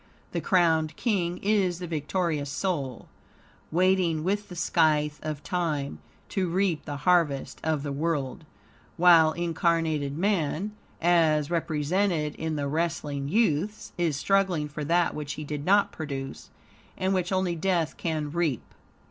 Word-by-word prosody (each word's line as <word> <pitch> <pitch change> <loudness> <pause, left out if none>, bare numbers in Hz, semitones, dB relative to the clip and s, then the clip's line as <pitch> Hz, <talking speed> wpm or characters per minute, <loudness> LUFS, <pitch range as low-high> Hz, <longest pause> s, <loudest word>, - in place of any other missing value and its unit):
The - - -2
crowned 160 -5 +2
king 180 -7 0
is 195 -4 +2
the 180 - -5
victorious 160 -2 -1
soul, 140 - -3 0.6
waiting, 175 -2 +2
with 205 +3 -1
the 180 - -8
scythe 155 -3 +2
of 155 -2 -5
Time, 155 - -2 0.3
to 185 -2 -1
reap 180 -2 0
the 145 -2 -4
harvest 165 -6 +2
of 155 -3 0
the 145 - -3
world; 145 -2 -2 0.5
while 165 -2 +7
incarnated 165 -4 0
man, 190 0 0 0.3
as 160 -3 +3
represented 165 0 0
in 160 -1 -3
the 145 -1 -2
wrestling 150 -2 -2
youths, 210 0 0
is 165 -5 0
struggling 185 -3 +1
for 150 +1 -6
that 170 +3 +2
which 145 -1 -4
he 155 - -6
did 150 0 -5
not 200 +2 +4
produce, 140 -4 -6 0.5
and 190 +1 0
which 180 -1 0
only 185 -2 +1
death 170 -2 0
can 155 -3 -2
reap. 160 -7 0
165 Hz, 140 wpm, -27 LUFS, 150-180 Hz, 0.6 s, while